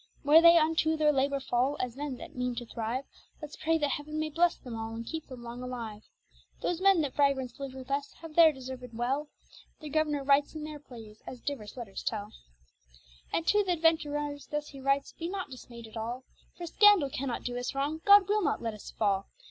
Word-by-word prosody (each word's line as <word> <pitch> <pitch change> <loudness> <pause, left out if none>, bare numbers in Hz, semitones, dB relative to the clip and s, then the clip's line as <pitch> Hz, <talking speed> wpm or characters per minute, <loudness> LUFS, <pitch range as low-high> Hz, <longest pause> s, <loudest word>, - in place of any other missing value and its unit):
Where 300 +3 +7
they 335 0 +8
unto 315 0 +2
their 305 -1 +4
labour 275 +1 +1
fall, 265 +2 0
as 250 -2 -3
men 280 -2 -4
that - - -10
meane 250 -1 -2
to 240 0 -5
thrive; 235 +4 -3 0.3
Let's 300 -2 -8
pray 325 +1 +1
that 295 -3 0
heaven 305 +2 -4
may 310 0 -2
blesse 340 +3 +3
them 245 -3 -8
all, 225 0 -5
and 230 0 -6
keep 320 +4 -5
them 255 -2 -10
long 240 +1 -7
alive. 235 -4 -6 0.6
Those 350 0 -1
men 390 -3 +5
that 285 -4 -2
vagrants 275 -4 +1
liv'd 275 -1 -6
with 260 0 -9
us, 280 0 -2
have 325 -2 -11
there 325 0 +7
deserved 255 -3 -8
well; 270 +5 -1 0.5
Their 305 -2 -8
governour 300 -2 +1
writes 280 +2 +3
in 310 - -5
their 305 -1 -7
praise, 225 -6 -13
as 250 - -7
divers 260 -4 -5
letters 225 -6 -6
tel. 210 -1 -4 1.0
And 330 - 0
to 415 +3 +4
th' - - -12
adventurers 295 -4 +1
thus 295 0 -3
he 275 -2 -11
writes 275 +1 +1
be 335 +1 -5
not 375 -6 -4
dismayed 235 -2 -10
at 220 +1 -10
all, 240 +4 -4 0.3
For 350 - -5
scandall 390 -5 +5
cannot 255 -2 -3
doe 245 0 -3
us 245 +2 -4
wrong, 290 +4 -1
God 405 -1 +7
will 420 +1 +2
not - - 0
let 225 -1 -3
us 210 - -10
fall. 200 -2 0
280 Hz, 215 wpm, -30 LUFS, 245-310 Hz, 1.0 s, they